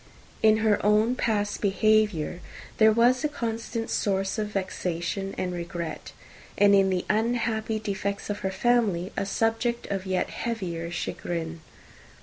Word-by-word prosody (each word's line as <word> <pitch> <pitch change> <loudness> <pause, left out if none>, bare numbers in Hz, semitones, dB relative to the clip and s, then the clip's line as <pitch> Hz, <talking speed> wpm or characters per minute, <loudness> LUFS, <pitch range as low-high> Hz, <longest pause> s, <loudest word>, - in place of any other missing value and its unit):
In 215 0 +5
her 210 -2 +3
own 215 +4 +3
past 210 -4 -1
behaviour, 205 -4 +2 0.4
there 220 0 +7
was 240 +4 +3
a 300 - +1
constant 230 -3 -3
source 195 +1 0
of 210 - -1
vexation 190 -1 -3
and 180 -1 -2
regret: 170 -1 -5 0.5
and 205 0 +6
in 195 -1 +5
the 185 -1 -1
unhappy 220 0 0
defects 200 -2 -3
of 205 0 -3
her 190 - -2
family, 195 -3 +1
a 195 - -2
subject 225 +3 0
of 195 -1 -3
yet 185 -1 0
heavier 180 -8 -3
chagrin. 170 -1 -4
205 Hz, 135 wpm, -26 LUFS, 185-225 Hz, 0.5 s, there